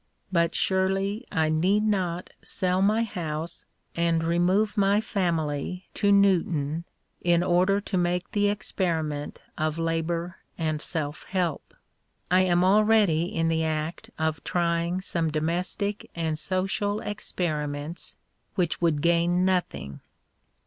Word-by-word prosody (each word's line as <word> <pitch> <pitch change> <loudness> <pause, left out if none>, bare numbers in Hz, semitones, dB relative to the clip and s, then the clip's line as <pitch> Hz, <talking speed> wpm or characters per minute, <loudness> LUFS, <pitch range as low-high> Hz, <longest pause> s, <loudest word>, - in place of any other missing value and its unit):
But 170 -2 +2
surely 195 +4 0
I 160 -1 +1
need 185 +7 +2
not 185 -5 -1
sell 185 0 0
my 215 +3 +3
house 165 -6 -5 0.3
and 170 -1 +1
remove 180 +6 +2
my 200 0 +3
family 175 -4 -2
to 205 -1 +2
Newton 170 -6 +2 0.4
in 175 0 +3
order 180 +3 +3
to 195 -2 -2
make 175 0 -1
the 205 -1 +2
experiment 165 -7 -2 0.2
of 155 0 0
labour 165 +2 -1 0.2
and 155 -2 -1
self 150 -3 -4
help. 180 -5 -2 0.6
I 185 +1 +6
am 175 -1 +3
already 205 -4 +4
in 165 -2 -1
the 160 0 +1
act 155 +1 -3
of 160 -1 -1
trying 170 +1 0
some 170 -3 0
domestic 175 +6 -2
and 160 -2 -1
social 195 +4 -1
experiments 155 -6 -3 0.4
which 175 -3 0
would 160 -4 +2
gain 170 +1 +3
nothing. 180 - -1
175 Hz, 120 wpm, -26 LUFS, 160-190 Hz, 0.6 s, I